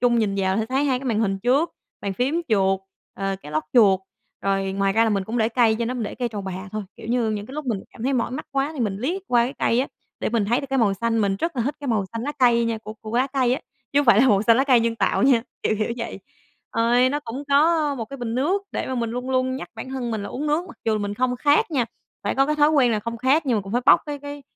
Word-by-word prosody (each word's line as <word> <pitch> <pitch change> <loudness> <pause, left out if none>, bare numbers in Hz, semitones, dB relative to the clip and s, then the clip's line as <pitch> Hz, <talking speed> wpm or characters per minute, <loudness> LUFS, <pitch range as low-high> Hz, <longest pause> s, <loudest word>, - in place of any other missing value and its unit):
trung 240 -1 +3
nhìn 210 -3 +1
vào 190 0 +1
sẽ 220 - -1
thấy 265 +3 0
2 260 -3 +1
cái 275 - -10
màn 225 -3 +1
hình 195 -3 0
trước, 270 - +2 0.3
bàn 200 -1 -3
phím, 275 - 0
chuột, 195 -3 +2 0.3
à, 195 0 -2
cái 150 - -9
lót 155 0 0
chuột, 200 -6 +5 0.4
rồi 195 -1 0
ngoài 195 0 +1
ra 225 +3 +4
là 225 - +1
mình 200 -2 0
cũng 230 +4 -3
để 220 -1 +2
cây 230 -2 +3
trên 235 -1 -1
đó, 250 - -2
mình 245 - -3
để 210 - -4
cây 245 -2 -2
trầu 210 -3 -5
bà 190 -1 -5 0.2
thôi, 215 0 -3
kiểu - - -10
như, 230 -1 +1
những 210 0 -3
cái 265 - -10
lúc 300 -2 -5
mình 215 -6 -1
cảm - - -10
thấy 265 +3 +1
mỏi 245 -2 0
mắt 275 +5 -5
quá 275 +1 0
thì 295 - -6
mình 205 -4 0
liếc 340 - -2
qua 240 -1 +4
cái 255 - -4
cây 235 - +2
á, 270 - -1 0.3
để - - 0
mình 225 -2 +1
thấy 235 +5 +1
được 275 - -6
cái 270 - +1
màu 210 -5 +3
xanh. 230 +3 0
Mình 200 -2 +1
rất 330 - -3
là 240 - +1
thích 280 +6 -1
cái 285 - -4
màu 215 -5 +1
xanh 230 0 -4
lá 290 - -3
cây 240 -2 +4
nha 230 -1 -1
của 215 0 -8
của 220 +1 -4
lá 255 +2 +3
cây 255 -3 +2
á, - - -5 0.3
chứ 280 - +4
không 290 - 0
phải 225 -2 +7
là 260 - +5
màu 200 -4 +4
xanh 230 +1 +5
lá 265 - +3
cây 255 -4 +5
nhân 230 0 0
tạo - - +1
nha, 255 -4 +4 0.2
kiểu - - +1
kiểu 220 +2 -1
vậy. 230 -1 -5 0.5
Ờ, 230 +1 +2
nó 290 +2 -1
cũng 260 0 -6
có 300 +1 +3
một 235 -4 -4
cái 275 +6 -9
bình 240 -3 -4
nước 340 +11 +1
để - - -2
mà 260 - -3
mình 235 -2 -1
luôn 250 +2 -4
luôn 260 0 +1
nhắc - - -7
bản 225 +3 -7
thân 255 -3 -3
mình 220 -3 -2
là 200 - -5
uống 290 +4 -4
nước 300 +4 +1
mặc - - -12
dù 220 -1 +1
mình 205 0 -3
không 250 +2 0
khát 290 +6 +3
nha, 265 -6 +1 0.4
phải - - -1
có 270 0 +3
cái 300 - +1
thói 295 0 +5
quen 265 -6 +4
là 215 - 0
không 230 +2 -5
khát 270 +6 +2
nhưng 245 -4 +2
mà - - +1
cũng 195 +2 -8
phải 245 - +1
bốc - - +7
cái 290 -1 -4
cái 285 0 -8
240 Hz, 315 wpm, -23 LUFS, 215-270 Hz, 0.5 s, phải